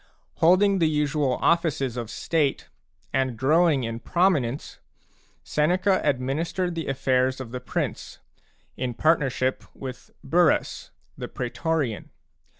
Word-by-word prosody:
Holding 190 +4 +4
the 160 -2 +3
usual 150 -3 0
offices 155 -7 +1
of 120 -3 -5
state, 150 +1 -1 0.4
and 130 -3 0
growing 150 +2 +3
in 115 0 -4
prominence, 150 -7 0 0.6
Seneca 185 +6 +1
administered 150 +7 -1
the 165 -1 -4
afFairs 130 -1 +1
of 125 -3 -7
the 125 - -4
prince, 125 - -4 0.6
in 125 -2 -3
partnership 135 -4 +1
with 130 -2 -8
Burrus, 165 +3 +1 0.3
the - - -4
praetorian. 130 -2 -2
145 Hz, 110 wpm, -25 LUFS, 130-165 Hz, 0.6 s, Holding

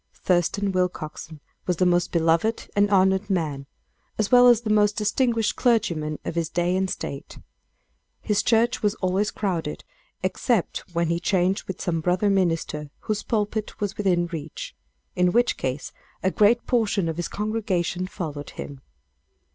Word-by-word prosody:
Thurston 190 +3 +1
Willcoxen 160 -4 -3 0.3
was 180 -2 +1
the 185 - +3
most 175 0 +2
beloved 165 +6 +1
and 205 0 +3
honored 190 +1 +3
man, 150 -7 -1 0.5
as 215 -2 0
well 245 0 +8
as 240 -2 +6
the 220 -2 -2
most 210 -1 +3
distinguished 230 +1 +1
clergyman 170 - +1
of - - -3
his 165 -1 -1
day 175 +1 0
and 190 0 0
state. 140 -5 -6 0.8
His 210 -2 +1
church 235 +2 +2
was 210 0 +1
always 190 +2 0
crowded, 175 -7 -3 0.4
except 185 +2 0 0.2
when 170 -1 +1
he 170 0 0
changed 185 +1 +1
with 190 - -6
some 165 -2 -1
brother 180 +5 +2
minister, 165 -5 0
whose 215 -1 -2
pulpit 215 -1 -2
was 205 -2 -2
within 180 -4 +1
reach 175 - -7 0.4
in 180 -1 +2
which 240 +1 +3
case, 130 +2 -4 0.3
a 190 - +2
great 215 +6 +3
portion 215 -7 +1
of 165 0 -3
his 175 -2 -2
congregation 195 -4 -2
followed 150 -6 -6
him. 140 -2 -8
185 Hz, 155 wpm, -24 LUFS, 170-210 Hz, 0.8 s, well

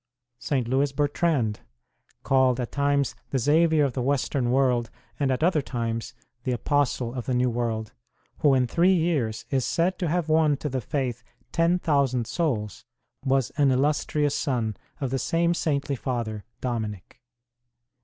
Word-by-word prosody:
St. 130 -5 -1
Lewis 135 +3 +1
Ber 145 +1 +2
trand 140 -9 0 0.7
called 130 -2 +3
at 120 - -3
times 140 -1 +1 0.2
the 135 - 0
Xavier 155 +3 +3
of 135 - -2
the 130 - -2
Western 135 -1 0
World, 125 -3 +2 0.3
and 140 -2 +1
at 130 +3 0
other 165 -3 +3
times 115 -4 -4 0.3
the 125 - 0
Apostle 125 -2 0
of 125 -3 -5
the 130 - +1
New 125 0 +2
World, 115 -2 -2 0.5
who 145 -3 +4
in 130 -1 +3
three 175 +9 +3
years 145 -11 0
is 135 -2 +1
said 175 +7 0
to 180 - 0
have 170 0 0
won 155 -2 +3
to 150 - -4
the 130 -1 -2
faith 125 -1 -2 0.3
10,000 145 -8 +2
souls 110 - -2 0.4
was 135 -2 +1
an 145 -2 +4
illustrious 145 +2 +1
son 120 -7 -1 0.2
of 135 -3 -2
the 135 - 0
same 170 +5 +1
saintly 145 -4 -1
father, 115 -5 -3 0.2
Dominic. 115 -2 -4
135 Hz, 155 wpm, -26 LUFS, 120-150 Hz, 0.7 s, who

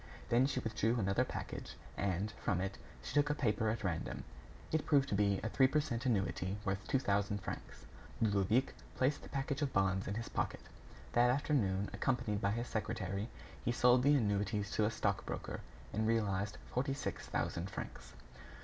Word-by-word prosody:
Then 125 +3 +5
she 135 - -1
withdrew 115 0 +1
another 100 -3 +2
package - - -5 0.2
and, 100 +1 0
from 95 - +1
it, 95 +1 -3 0.2
she - - -5
took 145 +1 +4
a 150 - +2
paper 110 -5 +1
at 110 +1 -2
random. 85 -4 -2 0.5
It 160 -1 0
proved 140 -2 +4
to - - -1
be 100 -1 +3
a 110 - 0
three 130 +3 +5
per 150 +3 +2
cent 130 -4 -2
annuity 95 -3 0
worth 95 0 -2
two - - +3
thousand 100 -4 0
francs. - - -7 0.3
Ludovic 110 +4 +2 0.2
placed 130 +3 +2
the - - -11
package 140 +1 -2
of 140 -2 0
bonds 95 -1 +2
in 100 - -2
his 115 +1 -3
pocket. - - -2 0.5
That 120 +1 +5
afternoon, 110 -8 +1
accompanied 120 -6 0
by 100 +1 +2
his 120 +2 -1
secretary, 105 -1 -2 0.3
he - - +1
sold 125 +1 +5
the 145 +3 +5
annuities 105 -3 +1
to 110 - +2
a - - +3
stock 115 - 0
broker - - -4 0.3
and 110 +1 +1
realized 105 -2 +1
forty 135 +2 0
six 140 - -4
thousand 85 +3 -1
francs. - - -7
110 Hz, 180 wpm, -36 LUFS, 100-125 Hz, 0.5 s, Then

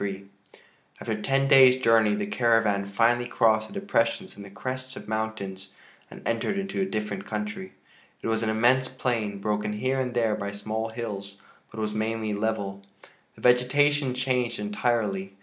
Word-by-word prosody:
XXIII 100 -1 -4 0.7
After 110 -2 -3
ten 135 +3 +1
days' 130 -1 +7
journey 115 -4 +4
the 105 0 -2
caravan 110 -3 +2
finally 120 +4 +2
crossed 110 -3 +2
the - - -13
depressions 195 - -1
in - - -11
the 100 - -10
crests 130 +5 -6
of - - -9
mountains 100 -3 -4 0.4
and - - -9
entered 115 - -1
into 195 0 -2
a - - +2
different 105 - -4
country. 105 -3 -5 0.5
It - - -2
was 110 0 0
an 110 - 0
immense 120 +4 +3
plain, 115 -6 -2
broken 105 +1 -1
here 130 +5 -1
and 125 -2 -2
there 115 -3 +2
by 100 -1 -4
small 110 +2 -3
hills, 100 -4 -6 0.3
but 110 - -9
was 105 -1 -2
mainly 110 0 -2
level. 100 -2 -2 0.5
The - - -16
vegetation 130 +2 +3
changed 125 -2 0
entirely. 105 -2 -1
110 Hz, 165 wpm, -26 LUFS, 105-125 Hz, 0.7 s, days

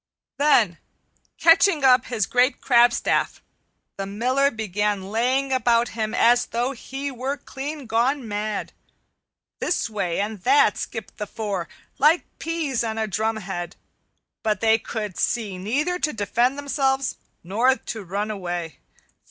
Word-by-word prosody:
Then 240 - +3 0.6
catching 330 -2 +5
up 255 -1 +5
his 225 -5 -1
great 250 +5 +2
crabstaff, 240 -2 +3 0.6
the 195 0 -4
Miller 255 +7 +1
began 205 -3 -2
laying 260 +4 +1
about 240 -2 +2
him 220 -1 -3
as 240 +1 +4
though 240 +3 -1
he 275 +2 -6
were 265 +3 -3
clean 285 +1 -7
gone 240 +3 0
mad. 210 0 -3 0.9
This 290 -9 -1
way 190 -5 -2
and 205 -1 -3
that 415 - +4
skipped - - -6
the 210 - -4
four, 200 -6 -4 0.3
like 305 +5 +5 0.2
peas 320 -7 -1
on 225 -1 -3
a 220 - 0
drumhead, 205 -4 -3 0.7
but 215 -3 0
they 225 +1 +4
could 210 -5 -5
see 210 -6 -1
neither 295 - -1
to 305 - 0
defend 235 +5 +1
themselves 275 -2 0 0.3
nor 230 +9 +2
to 220 -5 -7
run 200 +4 -3
away. 175 -5 -5
230 Hz, 135 wpm, -23 LUFS, 210-270 Hz, 0.9 s, catching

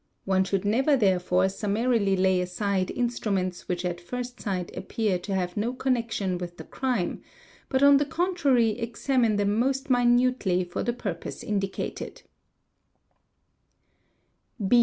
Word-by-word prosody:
One 190 -1 +3
should 195 0 -1
neve 265 +7 +3
therefore 185 -2 +3
summarily 205 +1 +1
lay 185 -1 +3
aside 185 +1 -1
instruments 200 -7 -2
which 180 0 -2
at 175 -1 -3
first 245 +6 -6
sight 185 -5 -3
appear 195 -1 -1
t 195 - -7
have 180 -2 -1
no 225 +4 -1
connection 230 -8 -1
with 175 -1 -7
the - - -8
crime, 250 -9 -2 0.5
but 265 0 +2
on 280 0 +8
the 290 - +1
contrary 280 - +1
examine 235 -1 +1
thet 205 - +1
most 265 +6 0
minutely 245 -6 +3
for 175 0 -4
the 240 - 0
purpose 200 -8 -5
indicated. 195 -2 -3
210 Hz, 130 wpm, -26 LUFS, 185-250 Hz, 0.5 s, on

